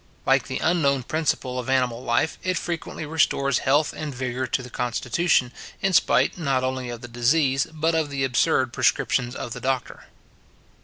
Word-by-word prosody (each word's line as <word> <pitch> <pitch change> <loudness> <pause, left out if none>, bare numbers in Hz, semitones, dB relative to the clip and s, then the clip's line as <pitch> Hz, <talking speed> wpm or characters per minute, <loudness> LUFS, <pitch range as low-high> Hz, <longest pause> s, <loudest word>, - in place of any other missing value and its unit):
Like - - +3
the - - -3
unknown 140 -6 +1
principle 130 -3 -1
of 125 +1 -5
animal 125 -2 +1
life, 120 +6 0
it 185 -1 -1
frequently 170 -2 -4
restores 145 -3 +1
health 145 +3 +2
and 150 -3 -5
vigour 130 0 -3
to 130 - -1
the 125 - -10
constitution, 125 +3 0 0.3
in 195 -1 0
spite 180 - +3
not 135 -5 0
only 130 -1 -2
of 120 -1 -6
the 120 - -8
disease, 130 +4 +2
but 160 +1 0
of 160 -2 0
the 140 -1 -2
absurd 130 0 +2
prescriptions 125 +1 +1
of 120 - -5
the 125 - -8
doctor. 130 -1 -3
130 Hz, 170 wpm, -24 LUFS, 125-155 Hz, 0.3 s, Like